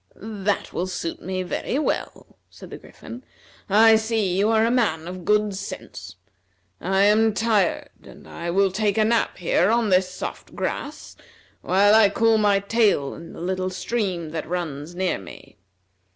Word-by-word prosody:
"That 205 -1 -3
will 180 - -2
suit 175 -2 -5
me 185 +1 -3
very 185 +7 -3
well," 300 - -4
said - - -14
the - - -8
Griffin. 240 +2 -12 0.5
"I 220 +2 +6
see 220 -4 -1
you 200 +3 +2
are 225 0 +3
a 230 - +1
man 170 -10 0
of 180 0 -7
good 210 -1 +2
sense. 185 - -8 0.6
I 195 +2 +1
am 215 +1 +3
tired, 215 -5 +1
and - - -15
I 170 0 -6
will 195 +2 +2
take 205 +1 0
a 215 - +3
nap 230 +1 0
here 180 +1 +1
on 230 -1 +2
this 185 0 +3
soft 185 - -7
grass, - - -5 0.5
while 200 +3 +3
I 220 -2 +6
cool 225 0 +2
my 205 -1 +3
tail 200 -9 +1
in 165 - -11
the - - -10
little 185 +1 -2
stream 185 -4 -3
that 160 0 -5
runs 170 -2 -4
near 185 - -1
me. 95 -3 -14
195 Hz, 165 wpm, -23 LUFS, 180-220 Hz, 0.6 s, I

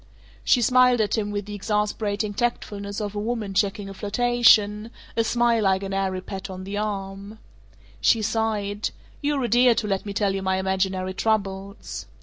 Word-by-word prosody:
She 245 - +4
smiled 250 0 +5
at 210 -2 +1
him 210 -2 -1
with 205 -1 -3
the 205 - -7
exasperating 210 0 -1
tactfulness 205 -3 -3
of 205 -1 -3
a 205 - -3
woman 215 -2 -3
checking 200 0 0
a 195 - -7
flirtation; 215 0 +3 0.3
a 230 - +2
smile 235 0 +2
like 190 -1 +2
an 195 0 -4
airy 190 -1 -1
pat 190 0 -7
on 185 0 -7
the 200 +2 -5
arm. 200 0 -4 0.6
She 220 - +3
sighed, 215 -1 -1 0.3
"You're 290 -2 0
a - - +1
dear 240 +1 +5
to 220 - -1
let 195 0 -2
me 200 - -4
tell 200 -1 +1
you 195 - -2
my 190 0 0
imaginary 190 0 -1
troubles." 200 -1 -2
205 Hz, 175 wpm, -24 LUFS, 195-225 Hz, 0.6 s, smiled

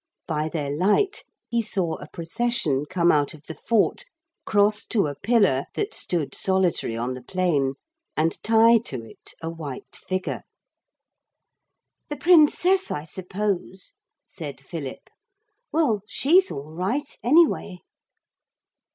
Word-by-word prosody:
By 155 -1 -1
their 150 -4 -3
light 210 - +2 0.2
he 235 -1 0
saw 190 -6 -1
a 145 - -10
procession 165 - -1
come 175 -1 +3
out 145 0 +1
of 150 - -17
the 160 - -8
fort, 220 +5 +1 0.4
cross 210 +1 +3
to 215 -7 +2
a 145 - -2
pillar 195 - +2
that 420 +1 -2
stood 165 -5 -2
solitary 190 -11 0
on 120 +2 -2
the 130 - -8
plain, 145 -4 0 0.4
and 160 +1 0
tie 225 +1 +5
to 130 - -4
it - - -13
a 165 - -3
white 150 -6 -7
figure. 185 0 -3 1.7
'The 295 - -4
Princess, 360 +3 +4
I 150 - -3
suppose,' 190 +2 -4 0.3
said - - -8
Philip; - - -7 0.6
'well, 265 -11 +2
she's 355 +11 +4
all 145 +3 -7
right 220 - -2
anyway.' 265 - +3
185 Hz, 125 wpm, -24 LUFS, 155-235 Hz, 1.7 s, tie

